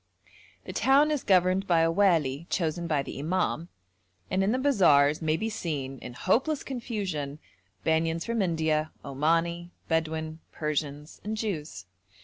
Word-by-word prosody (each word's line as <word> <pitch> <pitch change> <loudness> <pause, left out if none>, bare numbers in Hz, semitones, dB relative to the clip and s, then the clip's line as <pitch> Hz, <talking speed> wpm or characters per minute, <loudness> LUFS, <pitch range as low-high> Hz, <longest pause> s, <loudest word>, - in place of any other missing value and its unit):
The - - -6
town 285 +3 +4
is 295 -3 -1
governed 185 0 +3
by 170 -2 +4
a 165 0 +3
wali 165 -6 +2
chosen 170 0 -1
by 150 -4 +1
the 135 - -7
imam, 170 +1 -1 0.6
and 190 +1 +2
in 200 - +2
the 250 - +1
bazaars 165 - +4
may 160 0 +1
be 220 - -2
seen, 145 - -4
in 125 - -8
hopeless 265 - +1
confusion, 195 - -4 0.5
Banyans 160 +1 +1
from 230 -1 0
India, 160 -3 +1 0.2
Omani, 165 +5 0 0.2
Bedouin, 160 -1 -1
Persians 150 -1 -3
and 215 +1 -3
Jews. 165 - -4
165 Hz, 140 wpm, -28 LUFS, 155-195 Hz, 0.6 s, town